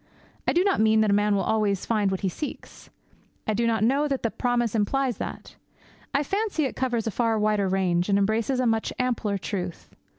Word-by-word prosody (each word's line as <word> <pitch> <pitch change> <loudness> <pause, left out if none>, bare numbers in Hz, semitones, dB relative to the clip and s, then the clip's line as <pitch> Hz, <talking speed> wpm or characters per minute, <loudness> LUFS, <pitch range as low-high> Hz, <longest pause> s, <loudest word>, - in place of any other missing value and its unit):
I - - +3
do 350 - +3
not 395 -1 +1
mean 220 0 +4
that 215 -2 +2
a - - +4
man 205 0 +3
will 195 - +1
always 210 -3 0
find 210 -3 +1
what 190 -1 -2
he 195 - 0
seeks. 285 - -7 0.6
I 215 - 0
do 230 +2 +1
not 225 -2 +1
know 275 +6 +2
that 275 -2 -2
the 230 - 0
promise 240 -3 0
implies 240 +2 0
that. - - -7 0.5
I 280 - +1
fancy 395 -2 -1
it 265 - -4
covers 245 -4 -1
a 225 - -1
far 230 0 +1
wider 210 -2 +1
range, 185 -1 +1
and 200 - +4
embraces 220 +6 +1
a 255 - +1
much 225 -1 +1
ampler 235 -5 0
truth. 180 -3 -5
220 Hz, 210 wpm, -25 LUFS, 200-255 Hz, 0.6 s, mean